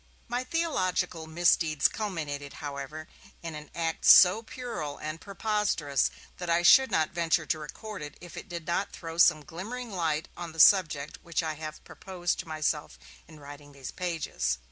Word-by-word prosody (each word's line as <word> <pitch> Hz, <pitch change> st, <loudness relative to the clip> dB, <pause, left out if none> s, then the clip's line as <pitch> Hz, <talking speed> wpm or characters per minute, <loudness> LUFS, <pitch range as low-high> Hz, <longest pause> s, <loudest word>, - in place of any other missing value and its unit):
My 245 Hz, +1 st, -2 dB
theological 185 Hz, -, -1 dB
misdeeds 160 Hz, -2 st, +3 dB
culminated, 150 Hz, -9 st, -4 dB
however, 145 Hz, +2 st, -7 dB, 0.4 s
in 165 Hz, -1 st, -5 dB
an 150 Hz, 0 st, -9 dB
act 165 Hz, -1 st, -2 dB
so 185 Hz, +4 st, +8 dB
puerile 230 Hz, -, -6 dB
and 155 Hz, +2 st, -6 dB
preposterous 200 Hz, -, 0 dB, 0.3 s
that 175 Hz, -1 st, -5 dB
I 170 Hz, +1 st, +3 dB
should 265 Hz, +9 st, +7 dB
not 155 Hz, -1 st, +1 dB
venture 165 Hz, -1 st, +1 dB
to 155 Hz, -, -1 dB
record 210 Hz, +7 st, -8 dB
it 150 Hz, -1 st, -8 dB
if 175 Hz, -1 st, -11 dB
it -, -, -9 dB
did 170 Hz, -2 st, -6 dB
not 175 Hz, +3 st, -1 dB
throw 165 Hz, 0 st, -7 dB
some 155 Hz, -3 st, +5 dB
glimmering 230 Hz, -, -6 dB
of 190 Hz, -, -6 dB
light 160 Hz, -2 st, 0 dB
on 170 Hz, -2 st, -7 dB
the 165 Hz, -, -10 dB
subject 155 Hz, -5 st, +5 dB
which 170 Hz, -1 st, -2 dB
I 160 Hz, -1 st, -2 dB
have 155 Hz, 0 st, -8 dB
proposed 180 Hz, -2 st, -4 dB
to 185 Hz, -, -6 dB
myself 155 Hz, -, -2 dB, 0.3 s
in 155 Hz, -, -14 dB
writing 145 Hz, 0 st, -12 dB
these 135 Hz, -2 st, -8 dB
pages. 160 Hz, -, -2 dB
165 Hz, 170 wpm, -28 LUFS, 150-185 Hz, 0.4 s, so